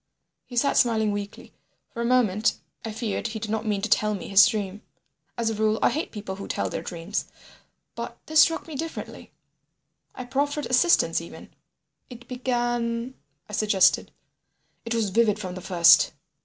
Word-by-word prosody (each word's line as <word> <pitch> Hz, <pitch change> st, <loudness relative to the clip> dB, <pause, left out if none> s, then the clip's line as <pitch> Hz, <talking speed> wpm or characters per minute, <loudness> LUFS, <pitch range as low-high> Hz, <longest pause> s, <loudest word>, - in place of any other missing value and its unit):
He 245 Hz, -, -8 dB
sat 280 Hz, +4 st, +2 dB
smiling 220 Hz, -3 st, +3 dB
weakly. 205 Hz, 0 st, -7 dB, 0.4 s
For 235 Hz, -, -5 dB
a -, -, -1 dB
moment 225 Hz, -4 st, +2 dB, 0.3 s
I 225 Hz, -, -4 dB
feared 220 Hz, -1 st, -3 dB
he 220 Hz, -1 st, -5 dB
did 215 Hz, 0 st, -5 dB
not 220 Hz, 0 st, -2 dB
mean 200 Hz, -2 st, -1 dB
to -, -, +1 dB
tell 210 Hz, 0 st, +2 dB
me 190 Hz, -, -7 dB
his 195 Hz, +1 st, +7 dB
dream. 205 Hz, -1 st, -3 dB, 0.6 s
As 230 Hz, -1 st, 0 dB
a -, -, -2 dB
rule 215 Hz, 0 st, +1 dB
I -, -, +4 dB
hate 310 Hz, -, -3 dB
people 200 Hz, -3 st, -6 dB
who 200 Hz, -, -7 dB
tell -, -, -2 dB
their -, -, -3 dB
dreams, 175 Hz, +3 st, -4 dB, 0.7 s
but -, -, -7 dB
this 315 Hz, 0 st, +2 dB
struck 325 Hz, -, +4 dB
me 320 Hz, -, -8 dB
differently. 320 Hz, +3 st, -7 dB, 0.8 s
I 255 Hz, -, -6 dB
proffered 285 Hz, +3 st, -1 dB
assistance 255 Hz, +8 st, +3 dB
even. -, -, -12 dB, 0.6 s
"It 245 Hz, -1 st, -12 dB
began—" 240 Hz, -1 st, -2 dB, 0.3 s
I 210 Hz, -, -12 dB
suggested. 210 Hz, -3 st, +3 dB, 0.7 s
"It 230 Hz, 0 st, -2 dB
was 220 Hz, -4 st, 0 dB
vivid 215 Hz, 0 st, +3 dB
from 185 Hz, -4 st, -6 dB
the 185 Hz, -, -7 dB
first. 170 Hz, -3 st, +5 dB
220 Hz, 170 wpm, -25 LUFS, 205-245 Hz, 0.8 s, his